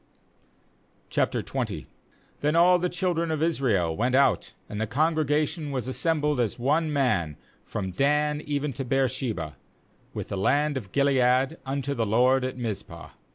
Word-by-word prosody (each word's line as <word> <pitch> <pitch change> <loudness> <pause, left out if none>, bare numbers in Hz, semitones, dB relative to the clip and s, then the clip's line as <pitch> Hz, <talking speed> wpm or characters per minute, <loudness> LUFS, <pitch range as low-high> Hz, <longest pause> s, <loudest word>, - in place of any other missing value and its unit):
OQ - - -1 0.5
Then 150 +2 +1
all 180 +1 +6
the 180 +1 0
children 175 -2 -1
of 155 -1 -1
Israel 110 - +1
went 125 +6 +1
out, 140 +1 +2
and 105 +1 -5
the 110 - -1
congregation 155 +2 0
was 130 -4 -3
assembled 150 0 0
as 115 -4 0
one 150 +6 +1
man, 110 - 0 0.3
from 95 -3 -4
Dan 150 +6 +1
even 145 -1 -2
to 135 - -4
Beer 135 +1 +2
sheba, 110 - -4 0.5
with - - -6
the 100 - -3
land 145 +9 +2
of 105 -8 -5
Gilead, 135 +1 +2
unto 140 +1 -2
the 115 -4 -1
LORD 125 +4 +3
at 130 0 -3
Mizpah. 100 -8 -5
135 Hz, 150 wpm, -26 LUFS, 120-150 Hz, 0.5 s, all